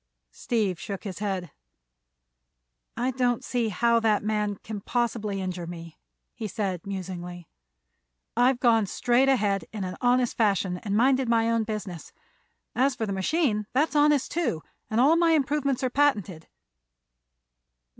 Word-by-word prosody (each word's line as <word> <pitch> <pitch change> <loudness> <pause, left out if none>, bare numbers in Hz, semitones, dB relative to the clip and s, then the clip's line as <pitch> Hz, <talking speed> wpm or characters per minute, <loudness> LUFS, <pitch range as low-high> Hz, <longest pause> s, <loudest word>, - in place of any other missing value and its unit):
Steve 210 -7 -1
shook 195 -2 -6
his 190 -4 -6
head. 190 -5 -3 1.5
"I 250 +2 0
don't 250 0 0
see 245 -5 -1
how 235 +3 +2
that 220 -3 +2
man 210 -1 -1
can 215 -2 -6
possibly 225 -3 -1
injure 180 -2 -4
me," 165 -1 -9 0.3
he 220 - -5
said, 195 -4 -3
musingly. 180 -3 -6 0.9
"I've 245 +2 +3
gone 225 -4 +3
straight 245 +7 +2
ahead, 205 -7 +1
in 210 -3 -4
an 185 0 -5
honest 245 -1 +2
fashion, 195 -4 +1
and 205 +1 -2
minded 260 +1 +3
my 230 0 +3
own 230 -1 +1
business. 210 -6 -6 0.6
As 260 +1 +2
for 225 - -2
the 200 - -3
machine, 210 - 0
that's 300 +4 +1
honest, 295 -2 +3
too, 305 - -1 0.3
and 220 - 0
all 285 +6 +5
my 335 -1 +4
improvements 280 -3 0
are 255 - 0
patented." 205 - +1
220 Hz, 145 wpm, -26 LUFS, 195-255 Hz, 1.5 s, all